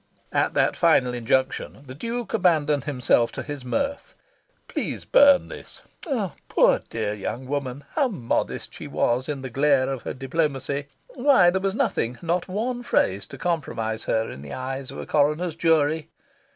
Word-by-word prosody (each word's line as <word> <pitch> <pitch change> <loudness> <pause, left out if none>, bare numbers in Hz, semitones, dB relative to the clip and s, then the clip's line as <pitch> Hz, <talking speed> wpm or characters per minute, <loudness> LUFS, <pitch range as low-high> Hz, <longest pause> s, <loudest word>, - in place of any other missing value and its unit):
At - - +1
that - - +3
final 125 -1 +3
injunction, 130 +3 -1
the 130 - -9
Duke 235 - -4
abandoned 155 - +2
himself 125 -4 +2
to - - -5
his 145 -3 -6
mirth. 280 - -2 0.5
"Please - - -4
burn 280 -1 +6
this." - - -11 0.7
Poor - - +4
dear 110 -2 -2
young 110 +5 -5
woman, 140 0 -3
how 280 - +2
modest 165 - -2
she - - -8
was 125 +3 0
in 140 -3 -3
the 130 - -4
glare 135 0 +3
of 130 - -6
her - - -5
diplomacy! 140 0 -2 0.2
Why 250 -9 +4
there 190 +1 -1
was 195 0 -1
nothing, 195 - 0
not 170 +1 0
one 235 +6 -2
phrase, 100 - +1
to - - -10
compromise 115 -10 -2
her 110 0 +1
in 65 - -9
the 70 0 -8
eyes 130 +1 -4
of - - -8
a - - -5
coroner's 150 +3 +1
jury!... 160 -2 +2
145 Hz, 165 wpm, -24 LUFS, 130-180 Hz, 0.7 s, burn